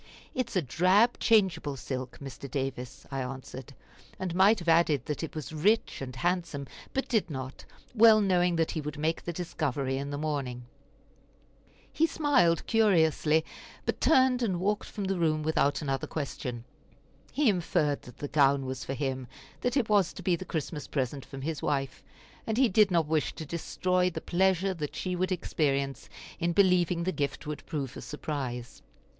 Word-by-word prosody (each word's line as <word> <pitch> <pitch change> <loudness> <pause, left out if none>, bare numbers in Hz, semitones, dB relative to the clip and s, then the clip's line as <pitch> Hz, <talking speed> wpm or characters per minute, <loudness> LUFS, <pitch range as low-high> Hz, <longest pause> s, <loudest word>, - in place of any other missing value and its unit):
"It 255 -2 -1
is - - -9
a 185 - +2
drab 185 - +3
changeable 185 -10 +2
silk, 130 -1 -5
Mr. 140 0 -8
Davis," 135 0 -4
I 135 -1 -2
answered; 130 +1 -7 0.4
and 185 -2 -3
might 195 +5 +5
have 175 -3 -8
added 160 -6 +3
that 150 - -3
it 160 - -5
was 155 0 -6
rich 205 +6 +1
and 130 -2 -6
handsome, 170 -3 -1 0.3
but 270 - -2
did 220 -7 +1
not, 130 -2 -6 0.3
well 225 -2 +7
knowing 180 -3 +2
that 165 -1 +1
he 155 - -3
would 150 0 -6
make 160 +2 0
the 175 - -4
discovery 140 -6 -2
in 140 +1 -4
the 145 - -3
morning. 140 -5 -3 1.3
He 325 - +3
smiled 275 - +2
curiously, 160 -7 +3 0.4
but - - -2
turned 260 -4 +4
and 190 -7 0
walked 205 +3 0
from 205 - -5
the 190 -1 -1
room 155 -2 +1
without 145 -2 +1
another 135 -2 -2
question. 125 -5 -4 0.7
He 295 -1 +1
inferred 170 -7 +1
that 125 - -14
the 145 - -4
gown 140 -2 +3
was 130 0 -4
for 135 - -4
him, 130 -2 -3 0.3
that 245 +3 0
it 245 -5 +2
was 200 -4 +3
to - - -9
be 180 - +2
the 185 - -7
Christmas 155 -2 -4
present 135 0 -2
from 135 -1 -9
his 160 0 -3
wife, 135 -2 -2 0.4
and 220 0 -1
he 260 -2 +4
did 210 +1 +5
not 170 -3 +2
wish 155 -1 0
to 160 - -6
destroy 180 +3 0
the 175 - -5
pleasure 190 +1 +1
that 150 -5 -5
she 185 -1 -2
would 185 +1 -1
experience 140 -7 -1 0.3
in 170 +1 0
believing 180 -2 +3
that 185 - 0
the - - -10
gift 140 -2 -2
would 150 0 -5
prove 140 -4 -4
a - - -7
surprise. 130 -5 -5
160 Hz, 180 wpm, -29 LUFS, 140-185 Hz, 1.3 s, well